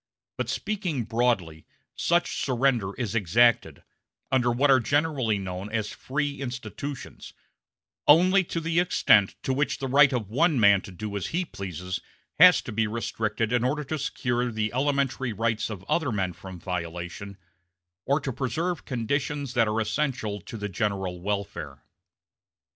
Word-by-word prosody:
But - - -3
speaking 185 - -2
broadly, 110 -9 -1 0.3
such 175 +1 +1
surrender 120 -6 +1
is 115 -5 -3
exacted, 115 +3 +2 0.5
under 125 -2 +3
what 135 +4 +3
are 130 - +6
generally 140 -4 +1
known 95 +1 -5
as 110 -2 -2
"free 145 +1 -3
institutions," 135 +2 -6 0.7
only 185 +6 +6
to 165 - -3
the 165 +1 0
extent 110 - +4
to 130 - 0
which 135 -1 0
the 135 - -3
right 140 +2 +6
of 120 -6 -2
one 140 - +2
man 100 -2 +6
to 95 - -10
do 100 +3 -6
as 100 - -2
he 175 +2 -1
pleases 90 - -5 0.4
has - - +8
to - - -6
be 110 +1 0
restricted 110 0 -2
in 120 -1 +2
order 145 +4 0
to 155 +2 -4
secure 125 -3 -1
the 110 0 -2
elementary 135 -2 0
rights 115 +1 -1
of 100 -4 -7
other 150 +5 0
men 95 -4 -1
from 90 +1 -10
violation, 90 +3 -5 0.7
or 140 +7 +1
to 135 -2 -3
preserve 160 +8 -2
conditions 140 +2 -2
that 115 -3 +3
are 105 +1 0
essential 110 -2 -2
to 115 - -8
the 105 -1 -3
general 95 -3 -2
welfare. 90 -8 -4
120 Hz, 155 wpm, -26 LUFS, 100-140 Hz, 0.7 s, has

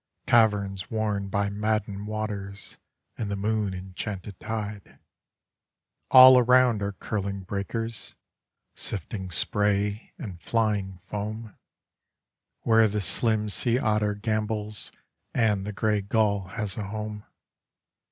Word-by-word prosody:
Caverns 100 -4 +2
worn 105 -3 -1
by 100 +1 -1
maddened 105 -1 -2
waters 105 -2 -4 0.4
and 110 - -2
the 100 - -1
moon 105 -1 -1
enchanted 95 +1 -6
tide. 105 -2 -5 1.1
All 130 0 +10
around 125 -3 +4
are 100 0 -2
curling 100 0 -3
breakers, 105 +4 -4 0.6
sifting 95 0 -3
spray 105 +3 0
and 95 - -8
flying 105 -3 0
foam. 110 +1 -5 1.1
Where 110 -1 +5
the 105 0 -2
slim 105 +4 +2
sea 120 +3 +2
otter 105 -3 +1
gambols 105 0 -2 0.4
and 105 -4 +2
the - - -2
gray 105 0 0
gull 100 -1 +1
has 100 -1 -4
a 105 -2 -3
home. 105 0 -5
105 Hz, 110 wpm, -26 LUFS, 100-110 Hz, 1.1 s, All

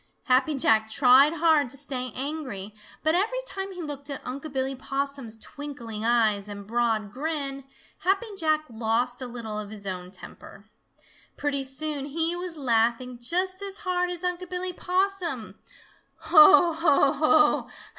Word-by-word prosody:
Happy 260 +4 +2
Jack 220 -4 +3
tried 265 +5 +5
hard 315 -4 +3
to 275 - -7
stay 255 -3 0
angry, 260 -8 -5 0.3
but 315 0 +3
every 420 +8 +1
time 390 -4 -5
he 360 -2 -7
looked 285 -2 -6
at 275 - -6
Unc' 280 +4 -6
Billy 265 0 -1
Possum's 270 -3 -4
twinkling 235 -4 -7
eyes 220 -3 +2
and 200 -1 -8
broad 225 -2 -1
grin, 275 0 -3 0.3
Happy 390 +5 +1
Jack 310 -4 +1
lost 235 +2 -1
a 255 - -4
little 230 -3 -6
of 210 -1 -7
his 205 -1 -9
own 180 -2 -5
temper. 195 +2 -13 0.7
Pretty 280 -2 0
soon 280 +1 -2
he 325 +4 0
was 350 -2 -6
laughing 240 -1 0
just 370 +8 -1
as 395 0 -4
hard 360 -1 0
as 355 0 -2
Unc' 360 0 -3
Billy 365 0 -3
Possum. 365 - -2 0.6
"Ho, 335 +2 +7
ho, 310 -4 +3
ho! 305 +1 +3
280 Hz, 150 wpm, -26 LUFS, 235-330 Hz, 0.7 s, Ho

